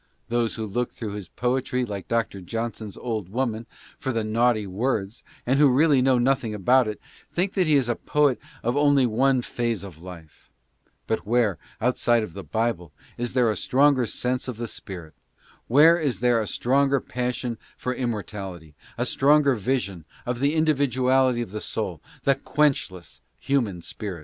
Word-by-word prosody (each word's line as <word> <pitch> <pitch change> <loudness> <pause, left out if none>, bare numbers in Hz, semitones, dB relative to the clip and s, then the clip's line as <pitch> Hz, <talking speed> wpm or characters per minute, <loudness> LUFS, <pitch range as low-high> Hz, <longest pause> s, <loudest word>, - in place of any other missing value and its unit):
Those 120 -1 0
who 110 - -3
look 120 +4 -2
through 110 -3 -6
his 100 -4 -6
poetry 125 +1 -1
like 100 -4 -6
Dr. 115 -4 -1
Johnson's 110 +1 -5
old 110 -7 -4
worn 115 0 -2 0.4
naughty 115 -2 +1
words, 105 +1 -2 0.2
and 130 +3 +2
who 145 -2 +7
really 140 +1 +4
know 130 0 +4
nothing 125 -3 +1
about 125 +5 +3
it, 105 - -4 0.3
think 185 +3 -1
that 185 -4 +1
he 155 - +4
is 135 -4 +3
a 120 - +2
poet 145 -1 +1 0.2
only 140 +3 +3
of 125 - +2
one 130 +2 +2
phase 120 -4 -2
of 85 -5 -10
life; 85 -4 -12 0.6
but 110 - -2
where 115 -5 +2 0.2
outside 120 -1 +2
of 90 - -7
the 100 - -7
Bible 110 -8 -2 0.2
is 120 0 -3
there 125 -3 +3
a - - -2
stronger 130 +3 +3
sense 125 +3 -2
r 115 - 0
is 145 -6 -1
there 120 -2 +3
a 105 - -3
stronger 135 +4 +2
passion 125 -1 -3 0.2
for 125 - -2
imm 100 - -5 0.2
a - - 0
stronger 140 0 +4
vision 100 - -2 0.2
of 125 0 -2
the 140 +4 +1
individuality 130 -5 +2
of 110 - -10
the 105 0 -5
soul, - - -4 0.2
the 140 - +4
quench 145 0 +1
less 90 -2 -12 0.2
human 110 -11 -1
soul 95 -2 -6
120 Hz, 160 wpm, -25 LUFS, 105-130 Hz, 0.6 s, who